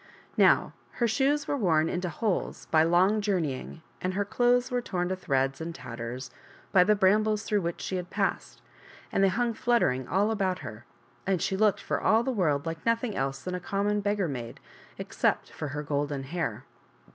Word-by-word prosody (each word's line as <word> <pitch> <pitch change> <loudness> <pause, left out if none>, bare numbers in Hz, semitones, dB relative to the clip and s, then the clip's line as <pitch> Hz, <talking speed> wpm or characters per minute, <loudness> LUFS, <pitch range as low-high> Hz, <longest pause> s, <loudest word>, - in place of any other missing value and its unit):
Now, - - +4 0.2
her 235 - +1
shoes 280 +5 +1
were - - 0
worn 165 - +2
into 180 +1 -2
holes 190 +4 -2
by 155 - +5
long 180 +6 +3
journeying, 165 -6 -2 0.2
and 185 0 -2
her 205 +1 0
clothes 245 +4 +2
were 245 0 0
torn 180 -5 -2
to 185 - 0
threads 135 -5 0
and 165 +1 -5
tatters 120 0 -6 0.4
by 190 -2 +6
the 210 +3 +4
brambles 210 +2 +3
through 210 -2 0
which 170 -1 -3
she 190 - -2
had 180 -1 -5
passed, - - -2 0.5
and 195 - +2
hung 235 +4 0
fluttering 175 - +1
all 205 +4 +2
about 190 -4 0
her, 110 0 -9 0.4
and 190 -2 +2
she 190 - -1
looked 210 0 +2
for - - -2
all 225 +1 +4
the 265 - -1
world 155 - +1
like 165 0 -5
nothing 230 -1 0
else 135 0 -2
than 180 - -4
a 180 - -2
common 205 +3 -1
beggar 205 -2 0
maid, 120 -5 -6 0.4
except - - -1
for 155 - -5
her 145 +2 -4
golden 145 -1 -2
hair. 135 -6 -3
185 Hz, 185 wpm, -28 LUFS, 150-210 Hz, 0.5 s, by